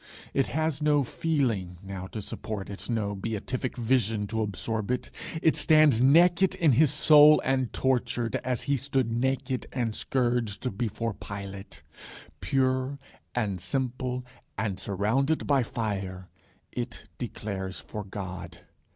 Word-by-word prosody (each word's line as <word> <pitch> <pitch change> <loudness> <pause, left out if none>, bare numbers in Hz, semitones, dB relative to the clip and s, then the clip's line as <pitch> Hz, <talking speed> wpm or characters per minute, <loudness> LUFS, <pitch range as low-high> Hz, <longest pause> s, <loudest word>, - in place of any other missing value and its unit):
It 135 - +2
has 155 -1 -1
no 150 -1 +3
feeling 120 - -1
now 95 -1 -6
to 105 +1 -6
support 105 -2 -5
it, 100 - -7
no 110 -4 0
beatific 115 +6 -3
vision 115 -3 +1
to 110 0 -1
absorb 110 +1 -2
it. 125 0 -2 0.3
It 160 - +4
stands 155 -7 +5
naked 175 +7 +5
in 160 -4 +4
his 145 +3 +4
soul 150 0 +7
and 130 -2 +1
tortured, 125 -2 0
as 125 -1 -2
he 140 -1 +1
stood 135 -2 0
naked 130 +2 -1
and 120 -4 -1
scourged 120 -3 -1
before 115 +1 -2
Pilate. 100 0 -8 0.6
Pure 130 +1 0 0.4
and 100 -7 -1
simple 125 +4 -2 0.3
and 100 -2 -2
surrounded 115 +10 0
by 140 -2 +3
fire, 95 -6 -4 0.4
it - - -5
declares 95 -3 -4
for 105 - -6
God. 95 -3 -7
120 Hz, 130 wpm, -28 LUFS, 100-135 Hz, 0.6 s, soul